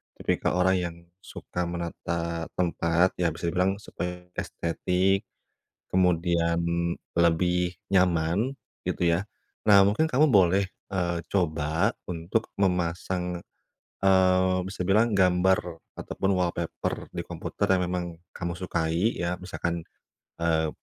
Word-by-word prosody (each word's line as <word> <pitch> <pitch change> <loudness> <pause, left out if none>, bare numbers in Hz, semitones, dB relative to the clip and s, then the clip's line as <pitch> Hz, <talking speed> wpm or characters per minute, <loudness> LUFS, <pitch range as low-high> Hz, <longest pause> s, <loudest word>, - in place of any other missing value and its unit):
tipikal - - 0
orang 95 +1 +4
yang 85 -2 -3 0.3
suka 90 0 -4
menata 85 -1 -3
tempat, 85 0 +1
ya 85 -3 +1
bisa 85 +1 -2
dibilang 95 +3 0
supaya 90 -1 -6
estetik. 95 +4 0 0.7
Kemudian 85 -2 +2 0.6
lebih 90 +1 +2 0.2
nyaman 90 +5 +2 0.3
gitu 85 -1 +1
ya. 90 +4 0 0.4
Nah, 100 -2 +8
mungkin 105 +11 +3
kamu 150 +1 +3
boleh, 95 -2 +5 0.2
eee, 90 -3 -1
coba 80 -3 +1 0.2
untuk 90 +6 -2
memasang 90 -1 -1 0.6
eee 95 -1 +4
bisa 95 -1 -4
bilang 105 +4 +3
gambar 95 0 +4 0.4
ataupun 95 - -2
wallpaper 85 -2 -2
di - - -2
komputer - - -3
yang 90 - 0
memang 90 0 -2 0.3
kamu 85 -1 -3
sukai 85 +3 0
ya, 90 +1 -1
misalkan, 85 -2 -4 0.5
eee, 80 -2 +1
90 Hz, 110 wpm, -27 LUFS, 85-95 Hz, 0.7 s, Nah